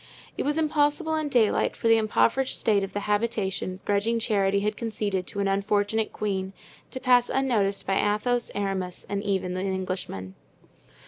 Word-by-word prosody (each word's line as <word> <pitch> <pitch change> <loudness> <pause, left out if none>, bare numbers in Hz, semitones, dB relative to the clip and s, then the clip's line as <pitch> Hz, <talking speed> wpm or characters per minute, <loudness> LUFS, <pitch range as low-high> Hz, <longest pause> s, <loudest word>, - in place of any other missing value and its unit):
It - - -3
was 295 +2 0
impossible 305 +1 +1
in 310 -2 -1
daylight 235 -6 +2
for - - -1
the 225 0 +6
impoverished 230 +4 +1
state 205 -4 +2
of 195 -1 -5
the 205 - -2
habitation 205 -3 -1
grudging 205 +3 +1
charity 200 -3 +1
had 210 +1 -1
conceded 205 -5 -2
to 200 - -4
an 200 - +1
unfortunate 205 +2 0
queen 195 -2 -3 0.4
to 260 - -5
pass 250 -2 +4
unnoticed 220 -7 +1
by 195 - +1 0.2
Athos, 245 +2 -1
Aramis, 195 -3 -3
and 200 0 -2
even 190 -3 -1
the 185 - -2
Englishman. 185 - -4
205 Hz, 165 wpm, -26 LUFS, 195-235 Hz, 0.4 s, the